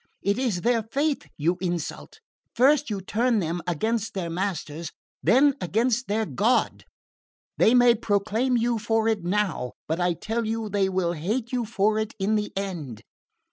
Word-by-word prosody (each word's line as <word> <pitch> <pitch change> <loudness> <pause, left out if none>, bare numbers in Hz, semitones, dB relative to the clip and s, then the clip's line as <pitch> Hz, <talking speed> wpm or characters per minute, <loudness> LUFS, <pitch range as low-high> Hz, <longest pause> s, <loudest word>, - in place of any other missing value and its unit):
It 200 +4 +1
is 225 -9 0
their 235 +1 +2
faith 280 +7 -1
you 170 +4 +1
insult. 175 - -4 0.3
First 275 +3 +4
you 200 -3 -3
turn 230 +5 +1
them 175 -2 -1
against 220 +6 -1
their 170 -3 -3
masters, 170 -3 -3 0.3
then 275 +4 +5
against 235 +6 0
their 215 +2 0
God. 225 +4 +1 0.7
They 230 - +5
may 245 -1 +7
acclaim 225 +3 +1
you 235 0 +1
for 225 +1 +1
it 220 -5 0
now 180 -9 -1
but 160 +2 -1
I 175 0 +2
tell 225 +6 -2
you 220 0 -2
they 195 -1 +1
will 185 -2 0
hate 215 +10 -2
you 245 -2 -1
for 215 0 +1
it 220 0 -3
in 200 +2 0
the 210 -1 0
end!" 170 - -5
215 Hz, 165 wpm, -25 LUFS, 185-235 Hz, 0.7 s, may